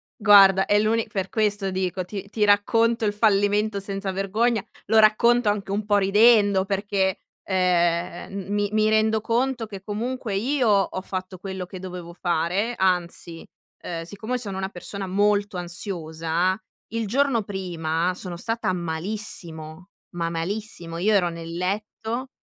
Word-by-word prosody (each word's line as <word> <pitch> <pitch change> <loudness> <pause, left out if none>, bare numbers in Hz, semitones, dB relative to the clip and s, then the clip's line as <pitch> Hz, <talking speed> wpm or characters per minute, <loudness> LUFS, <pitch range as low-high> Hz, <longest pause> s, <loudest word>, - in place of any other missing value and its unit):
guarda 195 -3 +7
è 205 - +3
l'uni 225 +2 +1
per 195 -4 -2
questo 205 -3 0
dico, 185 0 -2
ti 200 +1 -7
ti 210 0 +1
racconto 225 +3 +3
il 205 - +1
fallimento 205 0 +2
senza 195 0 -4
vergogna, 210 +3 0 0.2
lo 220 - +2
racconto 220 +2 +4
anche 205 -1 -2
un 205 +1 -1
po' 205 -1 +3
ridendo 205 0 +5
perché, 195 -1 0 0.3
ehm, 175 -2 0
m 195 0 -5
mi 205 0 0
mi 215 0 +2
rendo 220 0 +3
conto 240 +1 0
che 200 -3 -9
comunque 225 +1 -3
io 250 +3 +1
ho 195 -2 +2
fatto 185 0 -6
quello 190 -1 -5
che 185 +1 -9
dovevo 180 -2 -8
fare, 175 +6 0
anzi, 175 -2 -1 0.4
ehm, 165 -1 -5
siccome 215 +8 -4
sono 200 -5 -5
una 190 0 -3
persona 195 +1 -6
molto 205 +1 +1
ansiosa, 175 0 -2 0.4
il 230 -1 -1
giorno 255 0 +2
prima 175 -3 -2
sono 180 -2 -6
stata 225 0 -2
malissimo, 170 -1 -5 0.3
ma 170 -1 -1
malissimo. 170 0 -4
Io 205 +5 +2
ero 185 -4 +3
nel 165 0 -7
letto 215 +7 -3
195 Hz, 145 wpm, -24 LUFS, 180-215 Hz, 0.4 s, guarda